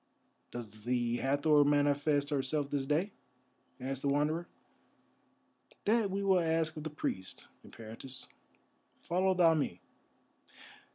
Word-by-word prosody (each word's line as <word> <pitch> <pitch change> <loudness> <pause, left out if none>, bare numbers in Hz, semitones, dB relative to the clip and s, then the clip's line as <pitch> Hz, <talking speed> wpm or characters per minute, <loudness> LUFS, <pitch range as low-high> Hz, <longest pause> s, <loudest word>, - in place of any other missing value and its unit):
"Does 110 -3 -8
the 120 0 0
Hathor 145 +3 +3
manifest 145 0 +2
herself 145 +1 0
this 140 -2 -1
day?" 165 +8 +1 0.7
asked 135 +1 -3
the - - -1
Wanderer. 150 +4 +1 1.4
"That 220 -1 +3
we 195 +1 -2
will 190 -2 +4
ask 160 -1 0
of 155 - -6
the 155 - -3
priests, 95 -10 -5 0.2
Eperitus. 115 +4 -10 0.7
Follow 185 +2 +1
thou 170 -3 +5
me." 140 - -1
145 Hz, 115 wpm, -32 LUFS, 135-165 Hz, 1.4 s, thou